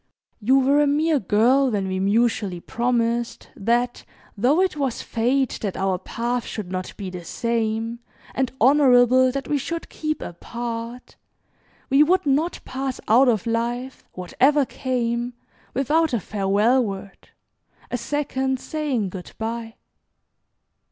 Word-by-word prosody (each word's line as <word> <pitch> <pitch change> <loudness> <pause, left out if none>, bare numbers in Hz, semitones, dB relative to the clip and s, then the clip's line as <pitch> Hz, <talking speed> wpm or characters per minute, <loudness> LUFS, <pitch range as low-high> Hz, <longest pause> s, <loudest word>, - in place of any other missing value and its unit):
You 250 +5 +3
were 275 +2 +4
a 295 - +3
mere 300 +1 +2
girl 245 +7 +3
when 200 -4 -1
we 185 0 -2
mutually 205 -2 +1
promised, 235 +2 -1
that 240 +4 0 0.3
though 255 - +3
it 375 -3 +2
was 275 -5 -2
Fate 250 +3 0
that 200 -4 -3
our 190 -1 0
paths 240 +5 -3
should 200 -5 -6
not 185 0 -5
be 195 -3 -5
the 180 -1 -7
same, 230 +2 -2 0.3
and 260 -2 0
honorable 255 -1 +5
that 275 +1 -4
we 290 - 0
should 335 +5 -5
keep 310 0 -3
apart, 235 +6 -6 0.7
we 275 +2 +6
would 365 +4 +3
not 295 +5 +1
pass 265 0 -4
out 250 +5 +5
of 225 -3 +2
life, 240 +3 -2
whatever 270 +11 +2
came, 245 -2 -2 0.4
without 300 +4 +2
a 235 - +2
farewell 210 +6 +2
word, 195 -2 -7 0.6
a 245 - 0
second 265 0 -1
saying 275 -11 -2
'good 180 -1 -9
bye.'" 225 0 -4
240 Hz, 135 wpm, -23 LUFS, 220-270 Hz, 0.7 s, we